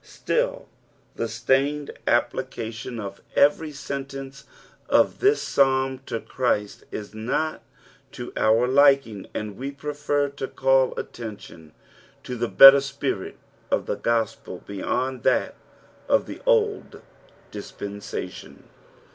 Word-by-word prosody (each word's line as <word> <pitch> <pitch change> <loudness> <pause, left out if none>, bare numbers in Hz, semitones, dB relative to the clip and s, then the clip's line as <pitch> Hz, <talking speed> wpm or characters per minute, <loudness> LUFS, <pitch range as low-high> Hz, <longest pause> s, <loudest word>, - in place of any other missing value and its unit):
Still - - -2 0.5
the 115 - -2
strained 135 +6 0 0.2
application 115 +2 -1
ot 100 -2 -7 0.2
every 150 +2 +3
sentence 135 -1 -7 0.4
of - - +3
this 415 +2 +3
Psalin 130 -1 +1
to 115 - -3
Christ 105 -6 -2
is 105 0 -7
not 125 +8 -2 0.5
to - - -7
our 115 +3 +3
liking, 135 -6 +3
and 105 -2 -4
we 135 +2 -4
prefer 145 0 -1
to 140 -1 -5
call 135 -1 +2
attention 100 -8 -9 0.5
to 125 - -5
the 120 -1 -2
better 135 0 +10
spirit 140 - -4 0.3
of - - 0
the - - -2
gospel 115 -2 -2
beyond 125 +6 -2
that - - +1 0.6
of - - +3
the - - -9
old 445 -4 +1 0.5
dispensation. 100 0 -7
135 Hz, 115 wpm, -24 LUFS, 115-140 Hz, 0.6 s, better